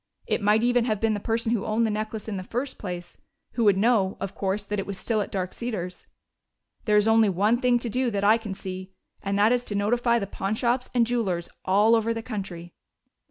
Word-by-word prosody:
It - - -1
might 210 +2 +3
even 245 -1 +3
have 215 -4 0
been 225 0 +1
the 205 - -2
person 225 +2 -1
who 230 -4 0
owned 220 +2 +1
the 220 - 0
necklace 215 0 -4
in 210 -3 -3
the 185 - -5
first 250 +7 -4
place, 175 -3 -7 0.3
who 235 - 0
would 200 -2 +5
know, 205 -3 +2
of 195 -1 -4
course, 195 +1 -2
that 205 0 -3
it 195 - -4
was 200 -1 -4
still 220 +1 0
at - - -4
Dark 185 -2 -3
Cedars. 185 -7 -5 0.8
There 210 -1 +4
is 210 +1 +3
only 225 -1 +5
one 210 +6 +2
thing 250 -2 +4
to 240 - -4
do 250 +3 0
that 200 -3 -2
I 215 +3 +5
can 210 -4 -6
see, 185 0 -7 0.3
and 200 0 -1
that 210 +3 +4
is 245 0 +2
to 205 - -4
notify 235 +4 +2
the 210 - -1
pawnshops 235 +6 -1
and 235 -1 +4
jewelers 200 -8 -1 0.2
all 205 +4 +4
over 230 0 +2
the 225 - -4
country." 185 -7 -6
215 Hz, 230 wpm, -26 LUFS, 195-230 Hz, 0.8 s, would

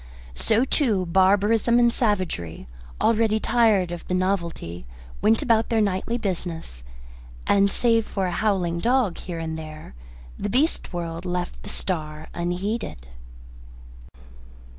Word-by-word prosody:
So, 225 - +2
too, 225 - +1
barbarism 200 +6 +3
and 240 -1 +4
savagery, 185 - -1 0.3
already 220 -1 +3
tired 215 -7 +3
of 175 -1 -7
the 180 - 0
novelty, 170 - -2 0.3
went 220 +1 +3
about 225 -2 +2
their 225 - +2
nightly 205 +3 0
business, 175 - -4 0.6
and, 200 0 +4
save 230 -1 +2
for 195 -2 -2
a 180 - -1
howling 180 -4 0
dog 235 -3 +1
here 175 -2 -6
and 160 -1 -4
there, 155 - -9 0.5
the 205 - -2
beast 280 - +1
world 170 -1 -4
left 180 -1 -3
the - - -9
star 155 -4 -4
unheeded. 175 - -3
190 Hz, 125 wpm, -24 LUFS, 170-225 Hz, 0.6 s, and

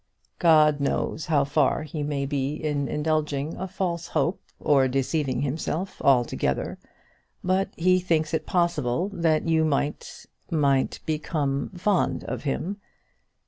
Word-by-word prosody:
"God 155 -4 +5
knows 145 +2 -1
how 150 -3 +3
far 145 +1 +1
he 155 0 -5
may 145 -1 -1
be 140 +1 -2
indulging 150 0 -1
a 190 - -4
false 175 -3 -3
hope, 160 +4 0 0.2
or 135 -3 +3
deceiving 135 +1 0
himself 160 +6 -3
altogether; 125 -3 +1 0.6
but 185 +1 +1
he 185 +2 +4
thinks 165 -3 0
it 155 -1 -1
possible 170 -2 +1
that 165 -3 +1
you 160 -1 +3
might 145 -1 -2 0.2
might 140 -4 +1
become 150 -3 -1
fond 190 +1 +1
of - - -5
him. 175 +8 -2
155 Hz, 125 wpm, -25 LUFS, 140-170 Hz, 0.6 s, God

